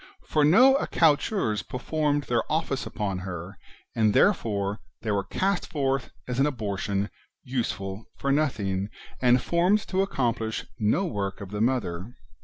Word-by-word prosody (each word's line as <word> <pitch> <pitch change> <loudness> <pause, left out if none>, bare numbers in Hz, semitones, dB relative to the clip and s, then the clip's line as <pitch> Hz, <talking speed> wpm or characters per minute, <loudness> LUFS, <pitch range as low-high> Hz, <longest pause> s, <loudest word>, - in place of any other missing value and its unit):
For 150 - +2
no 255 - +7
accoucheurs 160 - +2
per - - -6
formed 145 +1 0
their 120 -3 +1
office 155 -4 -1
upon 105 -4 -3
her, 90 0 -7 0.4
and 110 -2 +3
therefore 105 - +2 0.2
they 110 - -1
were 100 -1 +1
cast 195 0 -1
forth 135 -5 -1 0.2
as 125 0 -2
an 140 - +4
abortion, 100 -5 -2 0.3
useful 115 -6 -3
for 140 - 0
nothing, 105 -10 0 0.3
and 125 0 +5
formed 180 +9 +2
to 190 0 +2
accomplish 120 - -1
no 110 - +2
work 100 - -3
of 100 -1 -8
the 105 0 -2
Mother. 115 -4 -1
120 Hz, 145 wpm, -26 LUFS, 100-150 Hz, 0.4 s, no